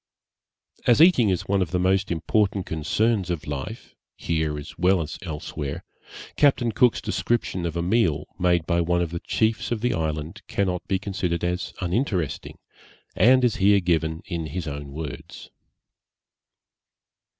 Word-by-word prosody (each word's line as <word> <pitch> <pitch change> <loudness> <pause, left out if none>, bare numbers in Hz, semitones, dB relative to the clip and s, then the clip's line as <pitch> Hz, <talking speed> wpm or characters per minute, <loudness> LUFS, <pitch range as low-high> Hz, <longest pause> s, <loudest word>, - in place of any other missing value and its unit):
As 120 - +5
eating 155 - +6
is 90 -2 -1
one 100 0 +2
of 90 - 0
the 90 - 0
most 95 +1 +2
important 95 +3 0
concerns 95 +5 0
of 85 -3 -3
life, 70 -3 -6 0.2
here 80 -2 -1
as 75 +2 -8
well 90 +2 +3
as 80 -2 -5
elsewhere, 75 -5 -5 0.5
Captain 135 -5 +3
Cook's 120 +2 +3
description 95 -7 -1
of 85 0 -4
a 85 - -1
meal 90 -6 +1
made 90 -2 +2
by 85 0 +1
one 85 +1 +1
of 85 - -4
the 85 - -3
chiefs 110 +5 0
of 115 -3 -1
the 125 +1 +1
island 80 0 -3
cannot 90 -3 -1
be 95 - +1
considered 90 -3 -2
as 90 +1 -2
uninteresting, 90 - -2 0.6
and 130 +3 +5
is 125 -1 +2
here 100 0 +5
given 80 -2 0
in 85 -4 -4
his 80 +3 -5
own 70 -1 -6
words. 75 -1 -8
90 Hz, 150 wpm, -24 LUFS, 80-100 Hz, 0.6 s, eating